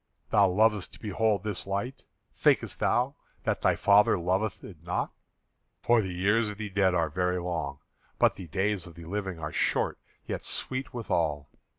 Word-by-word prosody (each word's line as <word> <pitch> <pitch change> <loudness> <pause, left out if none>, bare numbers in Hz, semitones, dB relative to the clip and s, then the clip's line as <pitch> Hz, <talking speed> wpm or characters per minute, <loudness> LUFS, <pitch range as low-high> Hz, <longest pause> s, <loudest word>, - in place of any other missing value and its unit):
Thou 100 -3 +6
lovest 105 +1 +2
to - - -12
behold 105 -1 0
this 105 -3 -2
light. 100 +7 -3 0.3
Thinkest - - +2
thou 125 +4 +1 0.3
that - - 0
thy - - +3
father 100 +1 +5
loveth 95 +5 -1
it 85 -6 -11
not? 90 +1 -2 0.7
For 120 -1 +4
the 95 -3 -4
years 100 +5 +2
of 105 - -7
the 105 -2 -5
dead 95 -2 +3
are 80 -3 +1
very 90 +2 0
long; 85 -6 -3 0.4
but - - +4
the 90 - -8
days 95 +3 -1
of 85 - -13
the 85 -1 -10
living 95 0 -3
are 75 -1 -5
short - - +1 0.3
yet - - -4
sweet 130 0 -2
withal. 80 - -1
95 Hz, 175 wpm, -28 LUFS, 90-105 Hz, 0.7 s, Thou